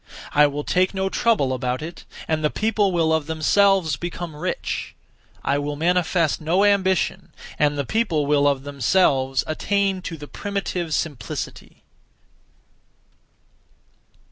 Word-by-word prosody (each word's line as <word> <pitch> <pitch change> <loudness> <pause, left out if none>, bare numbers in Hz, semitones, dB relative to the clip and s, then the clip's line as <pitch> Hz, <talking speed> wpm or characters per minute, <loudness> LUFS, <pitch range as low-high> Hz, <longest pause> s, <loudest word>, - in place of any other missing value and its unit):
I 150 0 +6
will 145 +1 -4
take 185 +4 +1
no 190 0 0
trouble 190 - +1
about 125 +1 -2
it, 170 +2 -8 0.2
and 155 -1 0
the 150 - +3
people 215 -1 +1
will 165 -2 +2
of 160 -2 0
themselves 165 0 +3
become 170 -1 -6
rich; 150 - -4 0.5
I 140 +1 +1
will 145 0 -3
manifest 170 0 +1
no 175 +6 +2
ambition, 190 -2 +1 0.3
and 145 -1 +2
the 140 - -1
people 170 - 0
will 145 0 +3
of 140 -2 +1
themselves 135 -2 +2
attain 195 +4 0
to 165 -2 -6
the 145 -1 -9
primitive 185 -5 -3
simplicity.' 135 -9 -5
160 Hz, 130 wpm, -22 LUFS, 145-190 Hz, 0.5 s, I